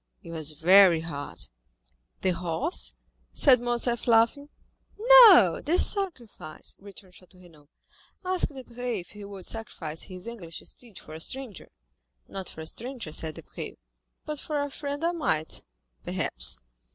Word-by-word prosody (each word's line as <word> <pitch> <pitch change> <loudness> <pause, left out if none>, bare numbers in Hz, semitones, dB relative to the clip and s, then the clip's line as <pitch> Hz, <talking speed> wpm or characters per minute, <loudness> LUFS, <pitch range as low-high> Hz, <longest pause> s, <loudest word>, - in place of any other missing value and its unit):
It 165 - -10
was 155 -2 -2
very 175 +2 +6
hard." 145 -3 -7 0.8
"The 190 - +1
horse?" 180 - -1 0.4
said 260 -4 +5
Morcerf, 240 0 -1
laughing. 235 +5 +3 0.5
"No, 440 - +8
the 335 +4 +1
sacrifice," 255 - +1
returned 195 -2 -13
Château 185 0 -16
Renaud; 155 -5 -19 0.6
"ask 370 -1 +2
Debray 245 -5 -5
if 175 - -16
he 210 0 -11
would 200 -2 -10
sacrifice 165 -8 -5
his 185 -1 -8
English 195 -9 -7
steed 235 -6 -11
for 155 - -11
a 160 - -8
stranger?" 255 +3 -5 0.6
"Not 190 -2 -5
for 160 - -9
a - - -7
stranger," 240 0 -5
said 155 0 -4
Debray, - - -8 0.5
"but 300 -1 -4
for 300 -2 -3
a 285 - -5
friend 285 +2 -5
I 340 - +2
might, 160 - -2 0.4
perhaps." - - 0
205 Hz, 140 wpm, -27 LUFS, 165-270 Hz, 0.8 s, No